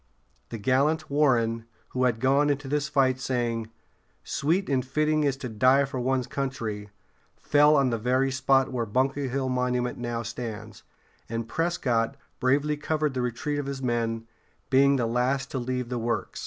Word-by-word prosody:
The 115 - -5
gallant 140 +7 +1
Warren, 115 -6 +2 0.2
who 130 0 0
had 115 -3 +1
gone 140 +4 +3
into 145 -1 -1
this 150 +1 -1
fight 130 -3 +2
saying, 120 -3 -2 0.5
"Sweet 170 +7 0
and 130 -2 +1
fitting 155 +3 +1
it - - +3
is 135 -1 -1
to 135 - -5
die 130 +5 +3
for 135 -2 -5
one's 130 0 0
country," 115 -7 -4 0.5
fell 150 +1 +4
on 135 -3 +3
the 115 - -1
very 130 +4 +1
spot 135 0 +2
where 120 -3 -2
Bunker 135 +5 0
Hill 135 +1 -1
Monument 125 -1 -1
how 120 -1 -2
stands; 115 -2 -7 0.5
and 115 0 -3
Prescott 135 -6 0 0.2
bravely 145 +3 +1
covered 150 -1 -1
the 130 - -1
retreat 145 +5 -2
of 140 - -4
his 135 -1 -5
men, 115 -2 -1 0.5
being 140 +1 +5
the 125 -3 +1
last 125 +4 0
to 135 - -2
leave 125 0 -3
the 125 -1 -2
works. 115 +1 -2
130 Hz, 170 wpm, -26 LUFS, 120-140 Hz, 0.5 s, being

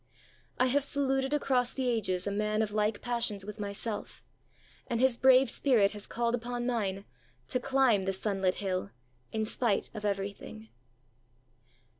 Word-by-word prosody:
I 255 - +3
have 270 +2 +2
saluted 270 -1 0
across 260 -4 +2
the 260 -2 -2
ages 195 -6 0
a 200 - -1
man 210 +1 0
of 210 - -3
like 210 0 -1
passions 230 -5 -1
with 210 +1 -8
myself, 205 +1 -4 0.6
and 235 - -1
his 260 -1 +4
brave 260 +1 +5
spirit 230 -8 +3
has 210 -1 -7
called 235 0 -1
upon 245 0 -3
mine 200 -5 -2 0.4
to 250 - 0
climb 250 -6 +2
the 195 - +1
sunlit 190 -1 0
hill 190 -1 -3 0.4
in 220 0 -1
spite 215 -2 0
of 215 -2 -7
everything. 205 +2 -4
220 Hz, 150 wpm, -30 LUFS, 200-250 Hz, 0.6 s, brave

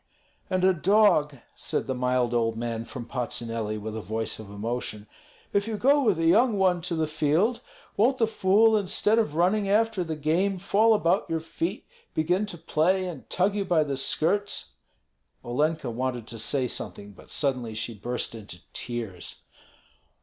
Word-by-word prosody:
"And 185 0 0
a 190 0 +5
dog," 175 -5 +3 0.2
said - - -2
the 130 - -2
mild 125 -1 0
old 115 -1 +1
man 115 -1 -3
from 120 -1 -7
Patsuneli, 115 -3 -3
with 110 +1 -6
a 110 - -4
voice 110 +2 -2
of 110 -2 -9
emotion, 105 0 -4 0.5
"if 200 +1 +1
you 220 -2 -2
go 280 +6 +4
with 215 - +2
a 165 - 0
young 225 +6 +4
one 185 -2 +2
to 170 0 -2
the 160 -1 +1
field, 155 +9 +1 0.4
won't 245 +6 +3
the 230 - +3
fool 220 +1 +4
instead 210 +2 +2
of 155 -10 -1
running 195 +4 +2
after 215 -2 +2
the 160 -2 -4
game 170 +6 +1
fall 215 +4 +3
about 170 -4 +1
your 165 - 0
feet, 165 +4 -4 0.3
begin 180 +6 +1
to 175 - -8
play, 170 +4 +1
and 160 -7 -8
tug 190 +3 +1
you 205 -1 -1
by 175 -5 +2
the 140 -2 -3
skirts?" 170 - 0 0.7
Olenka 150 +2 0
wanted 125 -1 -3
to 115 - -6
say 130 +3 +1
something, 100 -3 -5
but - - -17
suddenly 125 -6 -1
she 110 +2 -3
burst 120 +5 -3
into 105 -5 -9 0.2
tears. 115 -7 -6
160 Hz, 170 wpm, -26 LUFS, 120-195 Hz, 0.7 s, a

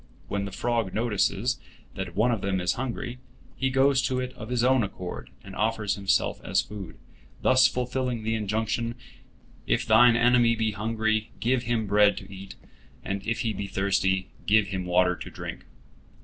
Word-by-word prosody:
When 100 0 -2
the 100 - -6
frog 115 -2 -1
notices 110 +1 0 0.3
that 90 -3 -6
one 110 +5 +3
of 115 -4 -1
them 95 -1 -1
is 90 0 +1
hungry, 125 -1 -4 0.4
he 135 - 0
goes 135 0 +3
to 130 -2 -1
it 125 0 -4
of 110 -1 -9
his 125 -1 0
own 130 0 +4
accord, 90 -3 -5
and 95 -1 -10
offers 110 -1 0
himself 100 -1 0
as - - +1
food, 100 -4 -5 0.5
thus 130 0 +6
fulfilling 125 -2 -2
the 110 +1 0
injunction, 110 +2 -1 0.7
"If - - +1
thine 120 -1 +6
enemy 120 0 +4
be 110 -1 0
hungry, 110 +1 -1
give 125 +2 +1
him 115 -2 0
bread 105 0 +4
to 95 0 -9
eat; 95 0 -9 0.5
and 100 0 -2
if 115 +1 0
he 110 -2 -1
be 100 - -4
thirsty, 95 -1 0 0.2
give 105 -1 +4
him 95 -2 -3
water 90 0 +3
to - - -8
drink." - - -8
110 Hz, 175 wpm, -26 LUFS, 100-120 Hz, 0.7 s, thus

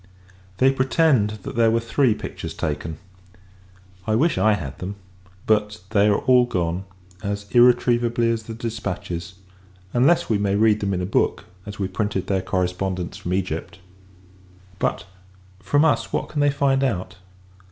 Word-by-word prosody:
They 130 +4 +5
pretend, 130 -5 +2
that - - -6
there 115 -1 +4
were 115 +1 +2
three 115 0 +1
pictures - - -7
taken. 75 +1 -3 1.1
I 110 - +2
wish, 155 +7 +2
I 110 0 +4
had 75 -10 -5
them: 95 +2 -5 0.5
but 105 -1 +1
they 105 -2 +4
are 105 - +3
all 125 -1 +5
gone, 90 -2 -2 0.4
as 100 -1 -3
irretrievably 120 -1 +4
as 115 -1 -1
the 110 +1 -8
dispatches; 90 -6 -5 0.6
unless 140 +8 +3
we 110 -3 +1
may 100 -1 +1
read 105 0 +3
them 100 -2 -1
in 90 - -2
a - - -1
book, 95 - 0 0.2
as 105 - -7
we 95 - -1
printed 100 -2 -2
their 95 -1 0
correspondence 90 -1 -2
from 90 +1 -3
Egypt. 90 -1 -3 1.0
But, - - -1 0.5
from 145 +11 +2
us, 115 -7 +1
what - - -2
can 150 - -2
they 145 - +4
find 140 -1 +1
out! 100 -9 -2
105 Hz, 155 wpm, -23 LUFS, 95-120 Hz, 1.1 s, They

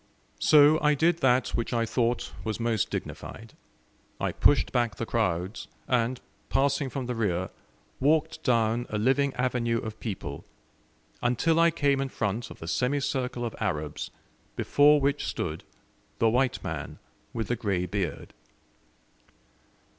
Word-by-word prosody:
So 150 +1 +6
I 150 0 +4
did 165 +3 +2
that 130 -3 +3
which 115 +1 -2
I 115 -1 +1
thought 120 +1 0
was 110 +2 -3
most 115 -2 0
dignified. - - -6 0.7
I - - 0
pushed 145 - +3
back 120 -3 +1
the 115 - -3
crowds, 95 -3 -1 0.2
and, 125 0 +1 0.3
passing 140 0 +1
from 130 -1 -4
the 125 - -2
rear, 95 -6 -1 0.5
walked 150 +3 +2
down 115 -1 +1
a 105 - -2
living 135 +5 +2
avenue 125 -2 0
of 110 -1 -6
people, 80 - -5 0.8
until 140 +7 +2
I 170 0 +6
came 140 -4 +1
in 135 - -2
front 110 0 -2
of - - -10
the 80 - -9
semicircle 125 - -1
of 115 - -5
Arabs, 75 -8 -3 0.5
before 145 +1 +5
which 140 +1 0
stood 80 +1 -3 0.5
the 115 - +3
"white 125 +1 +1
man - - -5 0.3
with 110 -3 -3
the 120 - +1
grey 95 -6 -1
beard." 90 -2 -4
120 Hz, 140 wpm, -27 LUFS, 110-135 Hz, 0.8 s, So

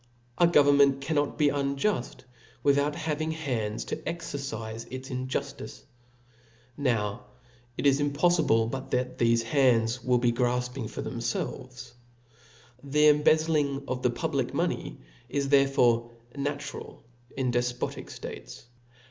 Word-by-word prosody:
•A 170 -1 +5
government 140 -2 +5
cannot 145 +1 -1
be 150 -2 +4
unjuft, 140 +2 -1 0.4
without 145 +1 +2
having 155 0 -2
hands 120 -9 -3
to - - -3
exencife 115 -9 -5
its 130 +1 -7
injuftice. 130 0 -4 0.9
Now 115 -8 -1 0.5
it - - -3
is 140 0 +4
impofli 155 +2 +2 0.2
blebut 135 0 -5
thefc 120 -2 +1
hands 120 -2 +2
will 125 0 +3
be 120 0 +2
grafping 125 0 -1
for - - -5
themfelves. 125 +1 -4 0.9
The 150 +2 +4
embezzling 150 -2 +2
of 130 0 -3
the 125 - +2
public 120 - -1
pioney - - -2 0.3
is 140 +1 -1
therefore 125 -4 +3 0.3
natural 145 +1 -5 0.3
in 130 -2 0
defpbtic 120 0 -2
ftates. - - -9
135 Hz, 115 wpm, -28 LUFS, 125-145 Hz, 0.9 s, A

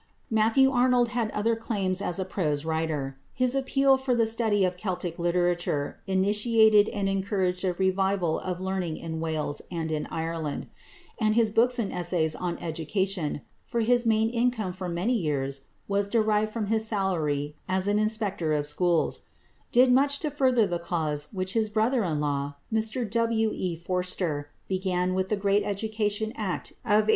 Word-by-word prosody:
Matthew 225 +5 +4
Arnold 245 -1 +3
had 235 -2 -1
other 225 +2 0
claims 195 -4 -1
as 180 - -1
a 190 - -1
prose 155 -6 -2
writer. 155 -4 -2 0.2
His 255 0 +2
appeal 270 0 +3
for 260 -2 0
the 230 -1 +3
study 220 -3 +2
of 180 0 -1
Celtic 180 -3 -4
literature 175 -4 0
initiated 210 +2 +4
and 200 -2 -2
encouraged 190 -2 0
a 185 -1 +1
revival 190 -2 +1
of 180 -1 -4
learning 185 -4 -2
in 160 -1 -5
Wales 155 -3 -2
and 165 -2 -3
in 155 -1 -2
Ireland; 160 -2 -3 0.5
and 215 -2 +2
his 225 -2 +3
books 240 +3 +3
and 220 -5 -2
essays 175 -3 0
on 175 -1 -3
Education 170 0 -2 0.3
for 235 -2 -1
his 240 +2 +3
main 225 -1 +2
income 235 -5 0
for 185 0 -5
many 175 +8 0
years 140 - -2 0.2
was 200 0 0
derived 215 -1 +2
from 220 -1 -2
his 220 +1 +1
salary 155 -8 -1
as 190 +1 +1
an 205 +1 +2
Inspector 210 -6 0
of 145 -1 0
Schools 170 +3 +1 0.5
did 250 +1 +5
much 280 +2 +3
to 305 - -1
further 255 -5 +3
the 175 -3 -2
cause 155 -4 -2
which 185 -1 -3
his 220 -2 +1
brother 225 +3 +1
in 160 -5 -1
law, 145 -1 -2 0.2
Mr 225 +2 0
W. 225 0 +1
E. 180 -2 -2
Forster, 175 -4 -2 0.2
began 185 -1 0
with 190 0 -1
the 210 - +2
great 200 +1 +2
Education 215 +1 -1
Act 200 -5 -3
of 210 0 +1
1870. - - -3
195 Hz, 170 wpm, -27 LUFS, 170-220 Hz, 0.5 s, did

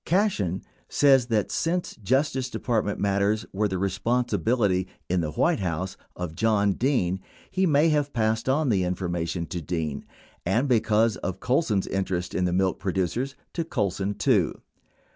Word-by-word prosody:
Cashen 160 - +1 0.3
says 135 -4 +4
that 110 -4 0
since 175 +2 -1
Justice 130 +4 0
Department 110 -5 -1
matters 100 +2 +1
were 105 +2 +1
the 95 -2 -2
responsibility, 110 -1 +1 0.2
in 90 0 +2
the 80 - -2
White 170 - +2
House, 95 0 -2 0.2
of 90 -3 -4
John 105 +1 +2
Dean, 95 -7 +1 0.3
he 190 0 +2
may 150 +1 +4
have 145 -2 +1
passed 110 0 0
on 145 +1 +2
the 95 -5 +2
information 85 -1 -2
to 85 +1 -5
Dean 80 -3 -3 0.4
and, 115 +10 +1
because 110 -3 +3
of 90 - -4
Colson 125 -5 +1
s - - -7
inter 95 -1 -1
est 90 0 -4
in 90 - +1
the 90 - +1
milk 95 +1 +1
producers, 100 +9 -1 0.2
to 170 - -1
Colson, 100 - -1
too. 105 - +2
105 Hz, 160 wpm, -26 LUFS, 90-130 Hz, 0.4 s, says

